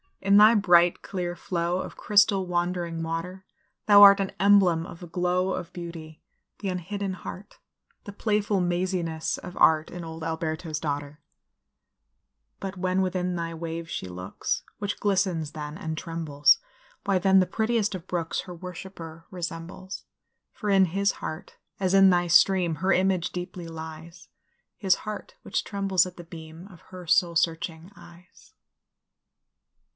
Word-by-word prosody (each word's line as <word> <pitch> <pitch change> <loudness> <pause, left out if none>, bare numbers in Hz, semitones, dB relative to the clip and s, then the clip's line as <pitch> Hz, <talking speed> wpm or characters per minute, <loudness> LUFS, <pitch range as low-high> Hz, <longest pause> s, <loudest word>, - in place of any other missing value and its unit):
in 195 +1 +4
thy 215 +2 +8
bright, 175 -4 +4
clear 180 -3 -4
flow 175 0 -2
Of - - -6
crystal, 200 -2 +3
wandering 175 -1 -2
water, 175 +3 -5 0.4
Thou 205 -1 +8
art 200 0 +10
an 195 -1 -1
emblem 190 -4 +4
of 170 - -10
the 175 - -9
glow 180 +2 0
Of 175 -1 -6
beauty 165 -2 -9 0.4
the 200 - -3
unhidden 190 +2 -3
heart 185 +2 -9 0.5
The 205 - -8
playful 205 -2 0
maziness 175 -2 -1
of 180 - -9
art 155 -1 +4
In 175 -1 -7
old 160 0 -8
Alberto's 160 -1 -3
daughter; 145 -1 -4 1.4
But 195 -1 -6
when 185 +1 +1
within 180 -1 -1
thy 165 -1 -3
wave 165 0 -5
she 95 - -4
looks 90 0 -4 0.2
Which 205 0 -3
glistens 185 -6 0
then, 150 0 -7
and 160 -5 -4
trembles 155 -3 +2 0.5
Why, 195 -2 +1
then, 190 +1 +5
the 185 - +2
prettiest 220 +1 0
of 185 -1 -7
brooks 170 -2 -2
Her 180 -2 -9
worshipper 170 -2 -9
resembles; 175 +1 -7 0.5
For 210 -3 -3
in 195 -1 +5
his 195 +3 0
heart, 165 +5 -7 0.2
as 190 -1 0
in 195 0 +7
thy 175 -1 +3
stream, 175 0 +4
Her 185 +5 0
image 185 -2 +1
deeply 180 -1 -6
lies 160 +1 -9 0.5
His 190 -3 +3
heart 215 0 -7
which - - -2
trembles 195 -3 +1
at 180 - -12
the 175 - -8
beam 165 +1 -11
Of 175 - -16
her 180 -1 -10
soul 170 +1 +3
searching 165 +1 -1
eyes. 175 0 -17
180 Hz, 150 wpm, -26 LUFS, 165-190 Hz, 1.4 s, art